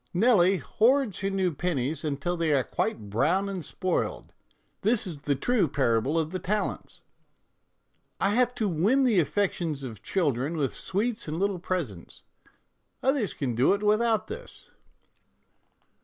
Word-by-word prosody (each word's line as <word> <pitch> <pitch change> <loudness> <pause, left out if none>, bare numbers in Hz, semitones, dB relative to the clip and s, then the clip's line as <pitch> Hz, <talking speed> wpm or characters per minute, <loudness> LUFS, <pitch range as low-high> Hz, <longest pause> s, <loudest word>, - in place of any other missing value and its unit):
" - - -41
Nelly 195 -3 +4
hoards 225 - +2
her 195 - -1
new 190 -3 0
pennies 155 -3 -2
until 150 +3 -2
they 165 -2 0
are 135 -2 +3
quite 105 -3 -3
brown 165 - +2
and 190 -4 -4
spoiled; 185 +3 -2 0.5
this 220 +2 +2
is 165 -6 -6
the 140 0 0
true 215 - +1
parable 135 +1 +1
of 160 -1 0
the 185 - -3
talents." 205 +4 -3 0.6
" - - -47
I 195 - +2
have 245 +2 +2
to 220 - 0
win 200 - +2
the 230 -7 +4
affections 170 -4 -1
of 115 -7 -7
children 150 -3 -1
with 140 -4 0
sweets 210 +3 -2
and 155 +1 -3
little 195 0 0
presents. 155 - -4 0.8
Others 265 -7 +1
can 130 -4 -2
do 125 - +3
it 205 - -6
without 215 +1 +2
this." 480 +4 -8
180 Hz, 155 wpm, -27 LUFS, 145-210 Hz, 0.8 s, Nelly